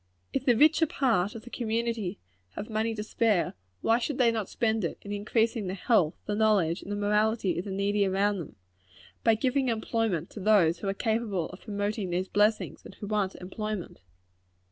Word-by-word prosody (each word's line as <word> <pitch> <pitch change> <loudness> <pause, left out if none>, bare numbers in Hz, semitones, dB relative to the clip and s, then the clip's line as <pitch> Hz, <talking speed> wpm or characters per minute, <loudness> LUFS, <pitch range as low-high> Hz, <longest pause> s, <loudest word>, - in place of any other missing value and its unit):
If 270 - -1
the 240 -3 +5
richer 315 +4 +5
part 220 -9 +1
of 225 - -8
the 245 - -12
community 225 -4 -2 0.4
have 215 - -6
money 220 +1 0
to 210 - -4
spare, 215 -4 +1 0.3
why 230 +1 +3
should 260 +2 -2
they 240 -3 +4
not 220 -4 -3
spend 220 -2 0
it 170 - -2
in 205 - -7
increasing 220 +1 0
the 185 - -3
health, 190 -6 +2
the 210 - -2
knowledge, 205 -5 +2
and 205 - -8
the - - -1
morality 210 -2 +1
of 175 - -4
the - - -5
needy 200 +1 +1
around 200 +1 +1
them 160 - -8 0.7
by 225 -1 +5
giving 260 +3 +1
employment 220 -6 -1
to - - -8
those 185 -5 +4
who 200 - -4
are 195 - 0
capable 220 -6 -1
of 180 - -11
promoting 205 -1 -2
these 180 +2 -1
blessings, 210 +1 +1
and - - -12
who - - -8
want 205 -2 -1
employment? 205 - -5
210 Hz, 190 wpm, -28 LUFS, 195-225 Hz, 0.7 s, the